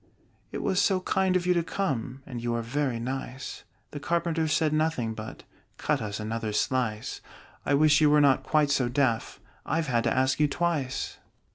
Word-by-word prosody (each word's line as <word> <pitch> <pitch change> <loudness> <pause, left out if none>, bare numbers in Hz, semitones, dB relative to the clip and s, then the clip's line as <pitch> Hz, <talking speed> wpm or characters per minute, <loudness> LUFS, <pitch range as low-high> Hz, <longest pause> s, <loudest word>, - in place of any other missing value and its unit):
"It - - -4
was 190 -1 +2
so 190 -2 +3
kind 190 0 +1
of 180 -1 +1
you 180 - +4
to 170 - +2
come! 135 - -3
And 125 -3 -6
you 120 0 -1
are 115 - -2
very 130 0 -1
nice!" 130 +1 -5 0.3
The 145 - -6
Carpenter 165 +1 0
said 155 +1 +1
nothing 155 -8 0
but 110 0 -8 0.3
"Cut - - 0
us 105 -1 -4
another 110 0 -3
slice: 115 -2 -1 0.5
I 140 - +4
wish 150 +1 +5
you 150 - +6
were 150 0 +5
not 140 -3 +4
quite 150 -2 +2
so 130 -3 +2
deaf 125 -3 0 0.2
I've 165 0 -1
had 120 -2 +2
to 115 - +2
ask 130 +1 +2
you 150 - +4
twice!" 145 -4 -2
140 Hz, 185 wpm, -27 LUFS, 120-160 Hz, 0.5 s, you